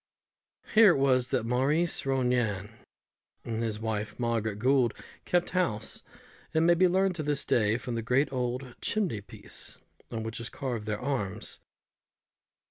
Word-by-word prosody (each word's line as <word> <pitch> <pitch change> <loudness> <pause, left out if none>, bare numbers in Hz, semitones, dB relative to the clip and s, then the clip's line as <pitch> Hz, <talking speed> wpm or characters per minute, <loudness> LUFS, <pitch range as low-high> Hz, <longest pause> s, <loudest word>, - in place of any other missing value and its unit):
Here 215 -4 +8
it - - 0
was 130 -2 +3
that 125 -4 0
Maurice 135 +7 +1
Ronayne 125 -6 +1 0.7
and 115 -1 -2
his 110 -2 -2
wife 105 -1 -3
Margaret 115 -3 0
Gould 125 0 +3 0.3
kept 175 0 +1
house, 140 - -1 0.5
as 160 - +4
may 170 +1 +6
be 185 +2 +4
learned 190 +1 +2
to - - -1
this 145 -2 0
day 110 -1 +2
from 125 -1 -5
the 115 - -1
great 125 +5 +1
old 125 0 -2
chimney 185 - -1
piece, - - -6 0.3
on 110 -1 -4
which 110 +1 -5
is 115 -1 -5
carved 120 -5 -4
their 105 -1 -1
arms. 110 -6 -3
125 Hz, 150 wpm, -29 LUFS, 110-140 Hz, 0.7 s, Here